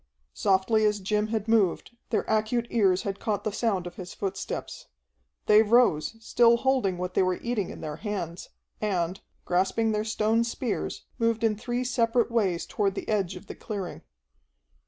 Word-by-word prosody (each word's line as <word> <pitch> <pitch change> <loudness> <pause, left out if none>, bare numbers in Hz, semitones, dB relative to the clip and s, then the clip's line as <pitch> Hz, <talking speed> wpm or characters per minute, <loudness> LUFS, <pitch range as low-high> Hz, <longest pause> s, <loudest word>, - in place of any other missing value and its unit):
Softly 200 +3 +2
as 210 -1 +2
Jim 210 +2 0
had 220 -1 -2
moved, 220 0 +1
their 220 - +1
acute 220 +2 +1
ears 195 -5 +3
had 200 -1 -3
caught 210 -3 -2
the 215 - -1
sound 200 -4 0
of 175 - -8
his 180 -1 -8
footsteps. 195 -1 -5 0.6
They 210 +1 +7
rose, 225 -6 +3
still 235 +1 +4
holding 250 -8 +1
what 180 +1 -4
they - - +3
were 185 -1 +1
eating 235 -5 -2
in - - -9
their 150 -1 -5
hands, 185 -4 -5 0.3
and, 185 -3 -1 0.2
grasping 190 +5 +1
their 210 0 0
stone 220 +1 +1
spears, 235 -1 -3
moved 230 0 +1
in 220 -2 +3
three 240 +3 -2
separate 240 -1 +1
ways 195 -7 +1
toward 200 -2 -1
the - - -5
edge 195 -4 0
of 180 +3 -10
the - - -7
clearing. 200 -5 -6
210 Hz, 170 wpm, -27 LUFS, 190-230 Hz, 0.6 s, They